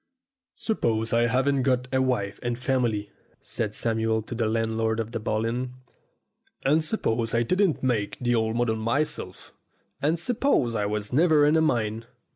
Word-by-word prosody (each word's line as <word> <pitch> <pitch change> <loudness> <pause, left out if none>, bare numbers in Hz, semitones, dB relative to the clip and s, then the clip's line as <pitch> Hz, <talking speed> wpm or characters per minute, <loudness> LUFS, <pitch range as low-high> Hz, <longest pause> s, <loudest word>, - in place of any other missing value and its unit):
"Suppose 115 - -1
I 120 0 +3
haven't 135 +3 +2
got 125 -1 +1
a 130 - +3
wife 110 -6 -1
and 120 -1 -2
family," 120 -5 -1 0.3
said 105 -2 -3
Samuel 110 -1 0
to 115 - -7
the 115 -2 0
landlord 110 0 0
of 115 0 -3
the 115 - -3
Bull 110 +1 -1
Inn, 125 +2 -3 0.9
"and 155 +4 +3
suppose 115 - -1
I 115 - +3
didn't 185 - +1
make 115 -6 0
the 120 -1 +1
old 110 -1 +1
model 120 -2 +1
myself, 115 -4 -2 0.5
and 155 +5 +2
suppose 195 - +1
I 105 -2 0
was 105 +2 -3
never 155 0 +5
in 150 +2 +4
a 160 - +4
mine. 115 -6 0
120 Hz, 165 wpm, -26 LUFS, 110-135 Hz, 0.9 s, never